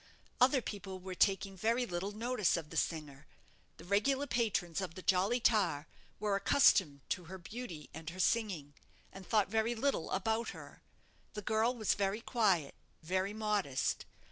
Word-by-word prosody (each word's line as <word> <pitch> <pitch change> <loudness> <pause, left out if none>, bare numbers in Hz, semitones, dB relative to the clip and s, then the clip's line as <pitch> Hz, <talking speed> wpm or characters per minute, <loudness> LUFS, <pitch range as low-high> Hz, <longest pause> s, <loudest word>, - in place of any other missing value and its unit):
Other 260 0 +5
people 190 -2 -6
were 185 0 -6
taking 195 +1 +2
very 230 +6 +1
little 180 0 -3
notice 215 -3 +1
of 155 -2 -7
the - - -8
singer. 150 -4 -2 0.5
The - - -12
regular 240 +9 +2
patrons 205 - 0
of 180 -3 -5
the 185 - -8
'Jolly 195 +6 +2
Tar' 190 -11 +2 0.3
were 210 -1 +1
accustomed 190 - +4
to 180 - -2
her 190 +3 -8
beauty 180 - -7
and 160 +1 -6
her 180 +2 -9
singing, 185 -9 0 0.4
and 190 -1 -10
thought 210 -3 +3
very 225 +2 +1
little 270 -6 0
about 220 +4 0
her. - - -12 0.5
The 210 - -5
girl 220 +4 +2
was 215 -4 +1
very 200 +2 -1
quiet, 195 - +1 0.3
very 185 +4 0
modest. 210 -11 0
195 Hz, 160 wpm, -34 LUFS, 175-225 Hz, 0.5 s, Other